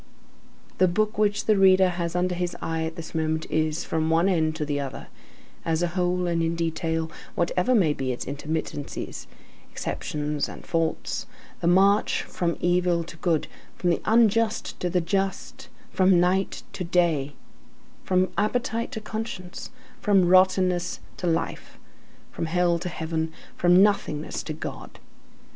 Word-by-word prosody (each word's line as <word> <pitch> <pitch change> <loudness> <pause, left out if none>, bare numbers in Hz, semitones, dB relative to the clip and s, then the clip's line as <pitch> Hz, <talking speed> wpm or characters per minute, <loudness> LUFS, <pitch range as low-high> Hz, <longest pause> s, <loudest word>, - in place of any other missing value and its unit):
The 185 - +6
book 215 +4 0
which 210 0 +1
the 215 - +4
reader 190 -1 +6
has 175 -1 -3
under 180 0 +1
his 175 0 -3
eye 160 0 -2
at 160 0 -5
this 165 - -8
moment 160 -1 -1
is, 155 0 0
from 160 0 -1
one 165 +3 +3
end 160 -4 +1
to 155 -1 -2
the 145 -1 -1
other, 135 -2 -6 0.5
as 165 +1 0
a 175 - +1
whole 180 0 0
and 170 -1 0
in 165 0 0
detail, 165 -1 -1 0.2
whatever 180 +7 +1
may 170 -9 +4
be 135 -2 -2
its 125 - -4
intermittences, 145 +1 -4 0.4
exceptions 150 -1 -3
and - - -10
faults, 165 -2 -1 0.3
the 170 - -1
march 195 +4 +4
from 170 -2 -2
evil 175 -1 +2
to 170 - -11
good, 165 -3 0 0.3
from 175 - +1
the - - 0
unjust 225 0 +2
to 180 - -1
the 180 0 +1
just, 195 +2 -2 0.2
from 185 -1 +4
night 185 +2 +1
to 185 - -4
day, 170 -5 +1 0.7
from 185 -1 +2
appetite 230 +2 -1
to 220 - -4
conscience, 215 -5 -6 0.3
from 195 -4 +3
rottenness 185 -1 +3 0.2
to 180 - -3
life, 165 -1 -2 0.5
from 165 - -3
hell 175 0 +2
to 180 +1 -4
heaven, 160 -1 -3 0.2
from 180 +2 +5
nothingness 160 -7 0
to 155 - -5
God. 155 - -7
175 Hz, 155 wpm, -25 LUFS, 160-185 Hz, 0.7 s, The